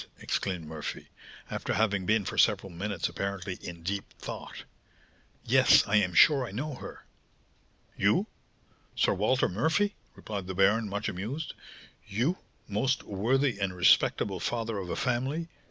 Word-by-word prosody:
exclaimed 90 -5 -2
Murphy, 75 -1 -6 0.4
after - - -2
having 100 -4 +1
been 110 -2 +2
for - - -4
several 100 -3 +3
minutes 95 0 -2
apparently 100 -1 -4
in 85 -1 -8
deep 100 +3 -3
thought. - - -7 0.8
"Yes, - - +6
I 105 - +3
am 90 -4 +1
sure 140 - +6
I 125 - -5
know 150 +3 -4
her." 125 - -10 0.9
"You! - - +2 0.7
Sir - - +3
Walter 110 +7 +2
Murphy," 160 - +1 0.2
replied 100 -4 -6
the 95 - -4
baron, 100 +3 +3
much 100 +1 -3
amused. 115 - -4 0.5
"You, 120 - 0 0.3
most 125 +6 0
worthy 120 +4 0
and 95 -2 -1
respectable 95 +1 +3
father 115 -3 -2
of 90 -2 -6
a - - -2
family! 135 +7 -1
105 Hz, 140 wpm, -29 LUFS, 95-125 Hz, 0.9 s, Yes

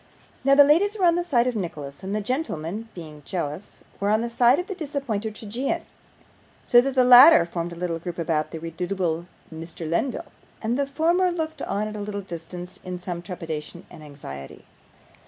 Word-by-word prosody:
Now 275 +1 +5
the 285 - +9
ladies 370 +9 +3
were 375 - +2
on 340 - +6
the 350 +1 0
side 255 -9 +2
of 250 -2 -1
Nicholas, 150 -8 -5
and 195 +2 -3
the 215 - -1
gentlemen 220 - -3
(being 155 -4 -9
jealous) 170 +3 -5 0.2
were 200 - 0
on 215 +1 +3
the 235 0 -3
side 245 +3 +5
of 360 - -2
the 390 - -5
disappointed 270 - -3
tragedian; 230 +6 -3 0.8
so 240 - +7
that 270 +1 -2
the 255 - +5
latter 250 - +9
formed 170 0 -4
a - - -7
little 170 -1 -3
group 175 +1 -6
about 160 -2 0
the 165 - -6
redoubtable 170 0 -3 0.3
Mr. 165 0 -7
Lenville, 170 - -2 0.3
and 230 +2 -1
the 280 - +1
former 335 +6 +2
looked 320 -2 -4
on 205 +2 -2
at 215 - -6
a 210 - -5
little 205 0 -4
distance 175 0 -8
in 180 -1 -5
some 175 -1 -5
trepidation 170 -3 -6
and - - -12
anxiety. 135 - -10
200 Hz, 190 wpm, -24 LUFS, 170-260 Hz, 0.8 s, the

